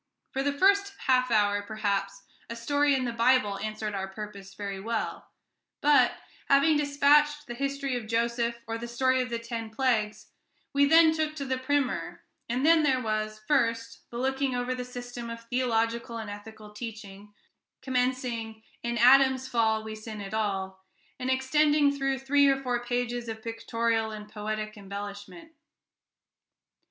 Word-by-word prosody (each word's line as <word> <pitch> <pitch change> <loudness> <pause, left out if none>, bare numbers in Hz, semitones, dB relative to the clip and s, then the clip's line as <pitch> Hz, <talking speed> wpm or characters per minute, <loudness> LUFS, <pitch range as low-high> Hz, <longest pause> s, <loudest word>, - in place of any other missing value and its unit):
For 270 - -1
the 285 +1 +1
first 395 +6 +3
half 255 -1 +3
hour, 205 -2 +2
perhaps, 200 -2 -2 0.3
a 230 - -5
story 285 +4 +2
in 260 -1 -1
the 240 - -1
Bible 230 -4 +2
answered 215 -1 -4
our 195 -1 -3
purpose 200 -1 -9
very 200 -1 -5
well; 225 +2 -3 0.5
but, 295 0 +4 0.3
having 280 +3 +5
dispatched 295 +1 +3
the 240 - -6
history 275 +1 -2
of 235 -3 -4
Joseph, 235 +1 -1
or 225 0 -4
the 235 - -5
story 260 +2 +2
of 250 - -3
the 235 - -2
ten 230 -1 -5
plagues, 220 -3 -1 0.4
we 280 0 +4
then 320 +1 +6
took 310 -1 -1
to 280 -2 -4
the 260 -1 -1
Primer: 275 0 -1 0.3
and 250 +4 0
then 330 0 +6
there 270 -4 +2
was, 215 -2 -2
first, 230 -4 0
the 235 - -7
looking 265 +1 0
over 245 +1 -1
the 250 0 -4
system 245 -1 -7
of 230 0 -7
theological 235 -1 0
and 220 -2 -6
ethical 210 +1 -10
teaching, 210 -2 -9 0.5
commencing, 250 -4 -2 0.2
"In 235 0 -2
Adam's 260 +2 +5
fall 220 -3 +1
we 220 0 -6
sinnéd 215 -2 -7
all," 190 -3 -2 0.4
and 255 - -2
extending 290 +3 +3
through 270 -1 0
three 280 +2 +3
or 270 -1 +4
four 250 -3 -2
pages 245 -1 -2
of 220 0 -6
pictorial 230 0 -1
and 210 -1 -8
poetic 215 0 -4
embellishment. 205 - -8
235 Hz, 155 wpm, -28 LUFS, 215-265 Hz, 0.5 s, then